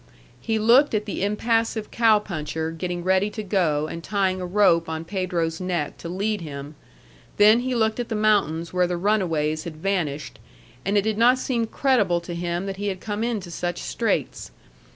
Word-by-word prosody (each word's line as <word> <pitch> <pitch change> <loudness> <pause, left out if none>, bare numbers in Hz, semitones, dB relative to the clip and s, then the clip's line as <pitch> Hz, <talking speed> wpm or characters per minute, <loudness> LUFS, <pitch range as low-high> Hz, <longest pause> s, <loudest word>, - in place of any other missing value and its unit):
He 220 - 0
looked 235 +5 +5
at 210 - -1
the 200 - -3
impassive 225 +1 0
cow 225 -2 +4
puncher 160 -5 -4
getting 175 +1 -4
ready 190 +2 +2
to 215 +1 -6
go 170 -7 +1
and 165 +1 -6
tying 190 -1 0
a 180 - -3
rope 175 -4 +3
on 160 0 -4
Pedro's 175 -3 -2
neck 175 -5 -2
to 170 - -7
lead 205 +3 -1
him, 145 -2 -7 0.6
then 215 +3 +6
he 255 0 -2
looked 220 0 +1
at 240 - -3
the 225 - -2
mountains 195 -7 +1
where 180 -1 +2
the 175 0 -2
runaways 165 -6 0
had 160 -2 -7
vanished, 155 - -2 0.4
and 200 +2 +1
it 200 - +3
did 215 0 -1
not 245 +2 +5
seem 240 -3 -1
credible 220 -10 +2
to 170 0 -7
him 175 +1 -2
that 195 -1 -5
he 205 +1 -3
had 190 -2 -2
come 210 +2 -3
into 215 -7 -3
such 175 0 -3
straits. - - -2
190 Hz, 190 wpm, -24 LUFS, 170-215 Hz, 0.6 s, then